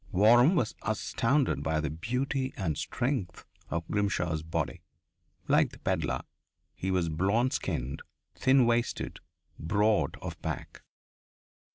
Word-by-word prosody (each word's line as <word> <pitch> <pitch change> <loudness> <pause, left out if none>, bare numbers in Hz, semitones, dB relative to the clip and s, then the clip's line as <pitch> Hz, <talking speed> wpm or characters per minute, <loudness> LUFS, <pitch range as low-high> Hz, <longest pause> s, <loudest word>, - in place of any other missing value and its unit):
Waram 120 - +6
was 120 -10 +1
astounded 115 +5 +1
by 80 -1 0
the 75 -1 -2
beauty 130 - -2
and 85 -7 -1
strength 120 - -2 0.2
of 85 0 -3
Grimshaw's 90 -6 0
body. 80 0 -3 0.7
Like - - +4
the - - -14
pedlar, - - -1 0.5
he 95 - -4
was 90 -3 +1
blonde 100 +11 +1
skinned, 65 +2 -2 0.3
thin 130 -1 +4
waisted, 120 0 0 0.4
broad 105 +6 +1
of - - -7
back. - - -5
105 Hz, 115 wpm, -29 LUFS, 85-120 Hz, 0.7 s, Waram